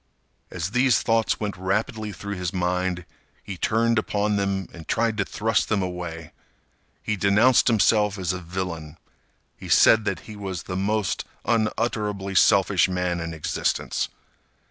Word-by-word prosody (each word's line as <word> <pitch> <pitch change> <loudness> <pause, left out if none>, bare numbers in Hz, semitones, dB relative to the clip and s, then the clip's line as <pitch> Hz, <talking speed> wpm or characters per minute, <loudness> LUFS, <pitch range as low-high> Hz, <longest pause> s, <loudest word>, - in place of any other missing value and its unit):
As 90 +1 -4
these 125 0 +3
thoughts 115 0 +1
went 105 -2 -3
rapidly 105 +3 -2
through 100 +2 -6
his 90 -3 -3
mind, 90 -1 -1 0.4
he 100 - -6
turned 115 +4 +1
upon 105 -1 0
them 100 -2 -1
and 80 -2 -11
tried 115 -1 +1
to 100 - 0
thrust 110 +1 0
them 105 -3 +1
away. 85 -3 -6 0.7
He 105 - -1
denounced 105 +6 +4
himself 105 -2 +3
as 90 -2 -1
a 90 - -4
villain. 85 -3 -5 0.6
He - - -10
said 110 -1 +6
that 100 -2 -2
he 110 - -10
was 95 -4 -5
the 90 - -5
most 100 +1 -1 0.2
unutterably 105 -3 -1
selfish 95 -1 +4
man 90 -1 -1
in 80 0 -4
existence. 80 - -1
100 Hz, 145 wpm, -24 LUFS, 90-110 Hz, 0.7 s, said